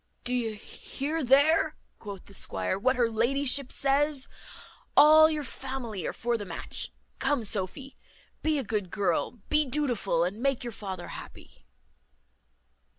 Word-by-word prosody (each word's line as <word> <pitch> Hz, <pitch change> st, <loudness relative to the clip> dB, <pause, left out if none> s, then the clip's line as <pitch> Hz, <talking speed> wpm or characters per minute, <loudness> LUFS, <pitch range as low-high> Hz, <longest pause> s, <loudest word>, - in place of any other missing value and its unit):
"Do 250 Hz, -, -1 dB
you 235 Hz, -3 st, -1 dB
hear 285 Hz, +8 st, -4 dB
there," 300 Hz, +5 st, +4 dB, 0.2 s
quoth 200 Hz, -3 st, -8 dB
the 200 Hz, -, -14 dB
squire, 95 Hz, -, -1 dB
"what 255 Hz, +5 st, +2 dB
her 240 Hz, -1 st, +3 dB
ladyship 255 Hz, +4 st, +2 dB
says? 280 Hz, 0 st, +1 dB, 0.7 s
All 310 Hz, +1 st, +8 dB
your 305 Hz, -2 st, -2 dB
family 255 Hz, -, -5 dB
are -, -, -1 dB
for 235 Hz, 0 st, -1 dB
the -, -, -4 dB
match. 175 Hz, -4 st, -3 dB, 0.3 s
Come, 280 Hz, -5 st, +1 dB
Sophy, 210 Hz, +7 st, -5 dB, 0.5 s
be 310 Hz, -1 st, +1 dB
a 275 Hz, -, -1 dB
good 210 Hz, -4 st, -2 dB
girl, 180 Hz, -3 st, 0 dB
and 235 Hz, -, -20 dB
be 300 Hz, 0 st, +4 dB
dutiful, 245 Hz, -, 0 dB
and 195 Hz, +6 st, -3 dB
make 275 Hz, -2 st, 0 dB
your 240 Hz, -1 st, -5 dB
father 190 Hz, -3 st, -6 dB
happy." 65 Hz, -, -11 dB
245 Hz, 150 wpm, -28 LUFS, 205-280 Hz, 0.7 s, All